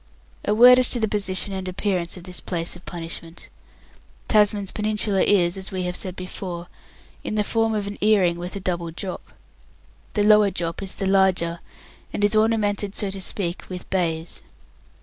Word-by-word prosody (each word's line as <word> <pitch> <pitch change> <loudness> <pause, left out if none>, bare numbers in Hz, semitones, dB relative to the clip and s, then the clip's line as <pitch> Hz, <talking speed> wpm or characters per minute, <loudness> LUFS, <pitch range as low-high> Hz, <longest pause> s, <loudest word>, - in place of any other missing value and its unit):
A 210 - +1
word 250 +3 +8
as 255 - +5
to 245 - +1
the 220 - +1
position 195 -1 +1
and 190 -1 -4
appearance 185 -2 -2
of 180 - -11
this 180 0 -7
place 170 -2 -1
of 175 - -15
punishment. 165 -1 -6 0.8
Tasman's 205 -2 +3
Peninsula 210 -2 0
is, 180 -2 +3
as 190 0 -5
we 185 -1 -3
have 180 0 -3
said 185 -1 -3
before, 180 -1 -6 0.5
in - - -3
the 210 - +2
form 225 +1 0
of 205 -1 -2
an 205 0 -7
earring 190 -5 +3
with 175 +2 -5
a - - -3
double 175 -3 -3
drop. 180 +3 -7 0.8
The 205 - +2
lower 210 -1 +6
drop 170 -2 -4
is 195 -1 -5
the 195 - -3
larger, 190 -3 +2 0.5
and 205 - -3
is 205 +1 +3
ornamented, 210 -2 +1
so 200 -2 +1
to 195 0 -3
speak, 180 -2 -2
with 180 -1 -7
bays. 165 -3 -2
190 Hz, 180 wpm, -23 LUFS, 175-210 Hz, 0.8 s, word